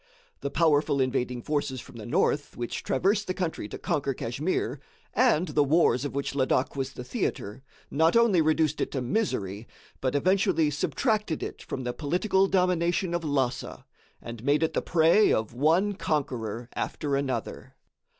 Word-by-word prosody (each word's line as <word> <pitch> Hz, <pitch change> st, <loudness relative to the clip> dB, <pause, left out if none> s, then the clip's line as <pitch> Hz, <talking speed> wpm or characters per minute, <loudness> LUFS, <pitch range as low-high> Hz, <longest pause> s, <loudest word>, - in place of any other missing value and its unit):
The 140 Hz, -, -3 dB
powerful 150 Hz, -3 st, +2 dB
invading 125 Hz, -2 st, -1 dB
forces 145 Hz, -3 st, -2 dB
from 120 Hz, -, -12 dB
the 110 Hz, -, -8 dB
north 145 Hz, +4 st, 0 dB
which 120 Hz, -1 st, -4 dB
traversed 200 Hz, +10 st, +1 dB
the 185 Hz, -, -2 dB
country 170 Hz, -, -3 dB
to -, -, -7 dB
conquer 140 Hz, -2 st, -1 dB
Kachmyr, 130 Hz, +1 st, -2 dB, 0.3 s
and 205 Hz, -8 st, +3 dB
the 150 Hz, 0 st, +3 dB
wars 140 Hz, -3 st, +3 dB
of 145 Hz, -, -5 dB
which 140 Hz, -1 st, -2 dB
Ladak 130 Hz, -1 st, +1 dB
was 135 Hz, -1 st, -3 dB
the 125 Hz, -, -7 dB
theatre, 120 Hz, -2 st, -3 dB, 0.3 s
not 160 Hz, +5 st, +3 dB
only 225 Hz, -7 st, +4 dB
reduced 155 Hz, -1 st, +1 dB
it -, -, 0 dB
to 135 Hz, -, -1 dB
misery, 115 Hz, -, -2 dB, 0.3 s
but 130 Hz, +1 st, -1 dB
eventually 185 Hz, -1 st, +2 dB
subtracted 210 Hz, -, -1 dB
it -, -, -6 dB
from 130 Hz, -, -5 dB
the 125 Hz, 0 st, -2 dB
political 185 Hz, -, +1 dB
domination 180 Hz, -1 st, +1 dB
of 175 Hz, -1 st, -1 dB
Lhassa, 135 Hz, -5 st, -2 dB, 0.3 s
and 115 Hz, -1 st, -9 dB
made 145 Hz, +4 st, +2 dB
it 160 Hz, -, 0 dB
the -, -, 0 dB
prey 170 Hz, +6 st, +4 dB
of 110 Hz, 0 st, 0 dB
one 165 Hz, +10 st, +2 dB
conqueror 125 Hz, -, -2 dB
after 145 Hz, -3 st, -2 dB
another. 140 Hz, -1 st, -3 dB
145 Hz, 160 wpm, -27 LUFS, 130-175 Hz, 0.3 s, only